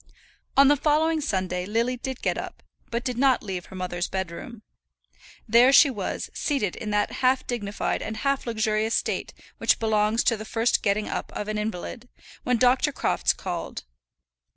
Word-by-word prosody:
On 275 0 +8
the 290 - +6
following 310 +2 +2
Sunday 185 -8 -2
Lily 230 +4 0
did 260 +1 -6
get - - +1
up, - - -7 0.3
but 235 +1 -2
did 250 -3 -3
not 265 -2 +3
leave 185 -4 -5
her - - -11
mother's 180 -1 -3
bedroom. 190 +5 -6 0.8
There 235 +4 +6
she 280 0 +7
was, 205 -6 -4
seated 265 - -1
in 215 - -5
that 210 0 +1
half 255 0 +3
dignified 205 -4 -2
and 220 - -5
half 275 +2 -1
luxurious 220 -1 0
state - - -1 0.3
which - - +3
belongs 220 0 +1
to 230 - +2
the 215 - -6
first 225 +2 +1
getting 210 0 0
up - - -4
of 210 - -4
an 215 0 -2
invalid, 220 +4 -5 0.3
when 250 -1 +1
Dr. 255 +5 +3
Crofts - - +1
called. - - -5
225 Hz, 170 wpm, -25 LUFS, 210-255 Hz, 0.8 s, On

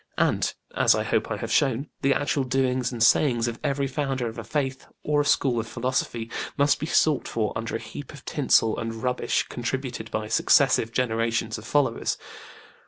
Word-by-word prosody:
And - - +2 0.2
as - - +4
I - - 0
hope - - 0
I - - -2
have - - -5
shown 135 0 +2
the 140 - +3
actual 145 0 +1
doings 130 -1 0
and 115 -2 0
sayings 120 -2 +4
of 120 -1 -4
every 140 -2 0
founder 135 -2 -2
of 110 - -6
a - - -5
Faith 135 -3 -3 0.2
or 150 -1 +2
a - - -2
school 130 -4 +2
of 115 - -4
philosophy 120 -1 -2 0.3
must 145 0 +3
be 155 - -3
sought 155 -4 +2
for 110 -2 -1
under 115 0 -3
a - - -1
heap 115 +4 -9
of 145 -4 -13
tinsel 125 -6 +2
and 115 0 -5
rubbish 125 0 0
contributed 125 -2 -4
by 110 0 -3
successive 110 +1 +3
generations 115 -2 0
of 110 - -11
followers. 145 -2 +1
125 Hz, 185 wpm, -25 LUFS, 115-140 Hz, 0.3 s, as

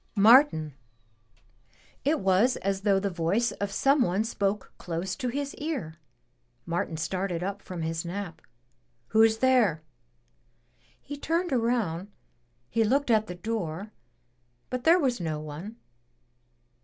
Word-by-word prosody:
"Martin!'' 210 - +5 0.7
— 115 - -33
^it 310 +2 +3
was 195 +6 +3
as 195 0 -2
though 200 -1 +3
the 200 0 -2
voice 180 +8 +1
of 200 -1 -4
some 275 +7 +3
one 195 -2 +2
spoke 205 -2 -2
close 175 +2 -3
to 255 - -3
his 280 +3 -3
ear. 265 - -4 0.7
Martin 170 -1 -2
started 180 +1 -2
up 200 +1 -4
from 175 -3 -6
his 160 0 -2
nap. 175 -1 -6 0.7
"Who's 220 0 +4
there?" 225 -11 +3 1.2
He 290 - -7
turned 330 +3 -1
around, 225 -8 0 0.6
he 225 - +1
looked 265 +4 +2
at 215 -1 +3
the 180 - -6
door, 200 -1 -4 0.8
but 255 -1 -3
there 335 +2 +7
was 255 - 0
no 155 -2 -2
one. 155 +9 -8
200 Hz, 130 wpm, -27 LUFS, 175-245 Hz, 1.2 s, there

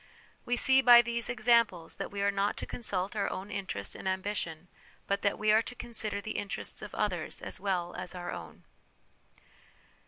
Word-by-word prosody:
" - - -25
' - - -36
We 245 - +2
see 265 +2 +5
by 240 -2 +9
these 235 0 -1
examples 235 -8 +2
that - - -4
we 200 0 -3
are 200 - +3
not 200 0 0
to - - -4
consult 195 -4 -2
our 205 - 0
own 195 +2 -6
interest 185 - -4
and - - -6
ambition, 185 -4 -3 0.4
but 200 0 0
that 200 - +1
we 215 0 +3
are 220 +1 +6
to 245 - -7
consider 220 -4 -3
the 215 +2 -4
interests 200 -1 -5
of 210 - -8
others 180 -6 -1
as - - -5
well 180 -3 -1
as 180 0 -6
our 175 -1 -5
own. - - -8
200 Hz, 195 wpm, -31 LUFS, 185-230 Hz, 0.4 s, by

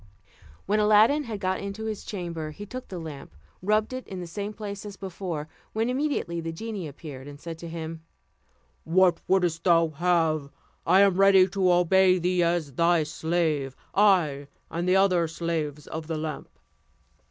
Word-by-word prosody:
When 210 +2 +1
Aladdin 215 +8 +5
had 220 -4 -5
got 185 -1 -1
into 200 +2 -5
his 215 -2 -4
chamber, 170 -5 -5
he 205 +7 -9
took 255 +5 -8
the 185 - -7
lamp, 150 - -8 0.3
rubbed 215 +5 +1
it 255 0 -6
in 190 - -6
the 175 - -5
same 200 +4 -5
place 205 -2 -7
as 205 -2 -8
before, 175 -5 -5 0.3
when 225 +3 0
immediately 255 - -1
the 165 0 -4
genie 200 0 -5
appeared, 140 -2 -9
and 145 0 -10
said 165 0 -7
to 170 - -7
him, 160 -1 -6 0.8
"What 175 +1 +3
wouldst 175 -4 +1
thou 165 -2 +4
have? 155 -2 +1 0.4
I 185 +3 +6
am 195 -2 +4
ready 195 -1 +6
to 185 -1 +2
obey 185 +1 +4
thee 180 0 +1
as 170 -4 0
thy 170 +2 +3
slave; 155 -4 -1 0.2
I, 170 -9 +3 0.2
and 175 +2 -1
the 185 - +4
other 185 -3 +3
slaves 155 -3 -3
of 160 0 -6
the 160 -1 -2
lamp." 155 -1 -5
175 Hz, 170 wpm, -26 LUFS, 160-200 Hz, 0.8 s, I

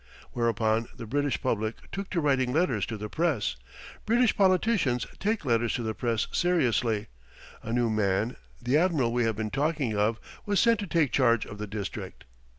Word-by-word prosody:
Whereupon 115 -1 +1
the 115 - -7
British 145 +4 0
public 110 -3 0 0.2
took 195 0 -5
to 175 - 0
writing 135 -4 +2
letters 135 - +1
to 110 - -4
the 105 +1 -5
press. 130 - 0 0.5
British 235 +1 +3
politicians 185 - +2
take 210 -3 -1
letters 115 -2 +1
to 120 - -3
the 110 -1 -2
press 115 -1 -1
seriously; 120 -11 +1 0.5
a 115 - -6
new 120 0 +2
man, 105 +2 0 0.2
the 125 +3 +1
admiral 155 -10 +1
we 120 -1 +2
have 110 -1 0
been 110 0 -3
talking 140 -3 0
of, 105 +2 +1 0.2
was 205 -1 +1
sent 230 -2 +4
to 205 - -4
take 165 -5 +2
charge 120 -4 +3
of 105 - -10
the 105 - -4
district. 100 -1 -6
120 Hz, 175 wpm, -28 LUFS, 110-165 Hz, 0.5 s, sent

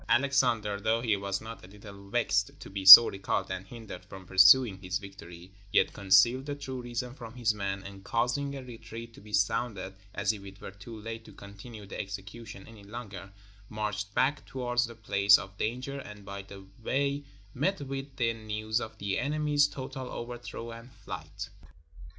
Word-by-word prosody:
Alexander, 120 -6 +2
though 110 +2 +1
he 115 -3 +2
was 100 0 -3
not 115 +1 -9
a - - -11
little 100 0 -13
vexed 100 -2 0
to - - -11
be 95 0 -4
so 115 +4 +15
recalled 95 0 -2
and 95 +1 -5
hindered 110 -5 -10
from 95 -1 -12
pursuing 95 +3 +6
his 90 0 -2
victory, 90 -3 -12 0.2
yet - - +3
concealed 105 +7 +4
the 145 - -3
true 130 -3 -6
reason 120 0 -5
from 120 -3 -11
his 120 -3 +1
men, 100 -1 -4
and 100 0 -11
causing 125 +6 -1
a 135 - -7
retreat 115 -1 -10
to - - -15
be 105 +1 -14
sounded, 105 -2 -1 0.2
as - - +1
if 100 -2 -10
it 100 0 -12
were - - -8
too 105 +4 -11
late 115 +1 -7
to - - -14
continue 100 +2 -11
the - - -8
execution 100 +1 -8
any 110 -3 -14
longer, 100 -3 -9 0.4
marched 105 -1 -4
back 135 +3 +1
towards 125 -1 -1
the 115 - -11
place 100 -2 +4
of 95 +2 -9
danger, 125 +5 -3
and 105 -5 -11
by 100 0 -6
the 95 0 -12 0.2
way 140 +4 -1 0.3
met 190 +10 0
with 135 0 -6
the 115 -3 +1
news 110 0 -3
of 110 0 -7
the 100 -2 -2
enemy's 145 0 +2
total 130 -2 -7
overthrow 120 -1 -7
and 115 +2 -11
flight. - - -8
110 Hz, 180 wpm, -29 LUFS, 100-125 Hz, 0.4 s, so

